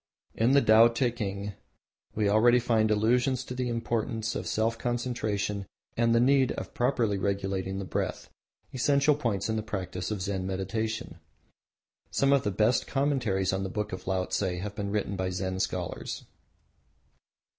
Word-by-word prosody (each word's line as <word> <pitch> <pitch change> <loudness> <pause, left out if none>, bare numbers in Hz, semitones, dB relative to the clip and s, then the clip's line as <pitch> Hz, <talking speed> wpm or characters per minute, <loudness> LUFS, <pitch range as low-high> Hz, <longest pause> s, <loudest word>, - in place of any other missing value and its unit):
In 115 +4 +2
the 140 - +5
Tao 110 +2 +7
teking 110 -5 -2 0.6
we 105 -1 +1
already 115 +4 +5
find 115 -2 +2
allusions 120 +4 +2
to 125 - -7
the 125 -1 -2
importance 115 -1 -2
of - - -4
self 115 +1 0
concentration 110 -5 -2 0.3
and 115 0 +3
the - - +5
need 130 +1 +4
of - - -7
properly 120 -5 +1
regulating 95 -1 -2
the 100 - -4
breath 90 - -3 0.5
essential 140 +3 +3
points 115 -9 -1
in 110 0 -1
the - - 0
practice 90 -4 -4
of 105 -4 -3
Zen 95 -1 -2
meditation. 110 +4 -3 0.9
Some 140 0 +2
of 140 - +4
the 105 - 0
best 110 +5 +2
commentaries 120 -10 0
on 95 - -1
the 95 - -3
Book 105 +1 -3
of 95 - -7
Laotse 95 -1 0 0.2
have 100 +2 -5
been 100 -1 -4
written 100 -1 -1
by 95 -1 -1
Zen 95 0 -3
scholars. - - -3
110 Hz, 155 wpm, -28 LUFS, 100-120 Hz, 0.9 s, Tao